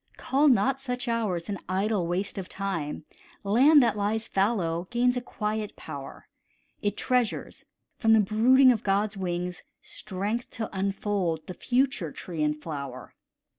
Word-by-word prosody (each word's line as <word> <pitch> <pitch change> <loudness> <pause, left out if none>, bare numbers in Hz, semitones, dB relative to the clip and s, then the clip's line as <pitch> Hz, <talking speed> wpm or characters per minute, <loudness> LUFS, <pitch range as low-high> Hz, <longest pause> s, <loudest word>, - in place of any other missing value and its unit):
Call 280 +3 +2
not 265 +2 +3
such 250 -1 -4
hours 210 -8 -1
an 200 -3 -3
idle 190 -1 0
waste 185 +3 -2
of 185 - -7
time, 165 -7 -4 0.4
Land 265 +8 +6
that 230 -3 +2
lies 215 +2 -1
fallow 185 -4 0
gains 245 +1 +2
a 250 - -1
quiet 215 -2 -3
power; 140 -3 -9 0.5
It 205 0 -1
treasures, 250 -3 -1 0.3
from 225 -1 +4
the 220 - +6
brooding 245 +6 +5
of 225 -4 0
God's 205 +1 0
wings, 180 -1 -3 0.2
Strength 210 +4 -4
to 220 -3 -5
unfold 190 -4 -1
the 185 - -6
future 245 - 0
tree 165 0 -6
and 150 0 0
flower. 140 -5 -7
205 Hz, 145 wpm, -27 LUFS, 180-235 Hz, 0.5 s, Land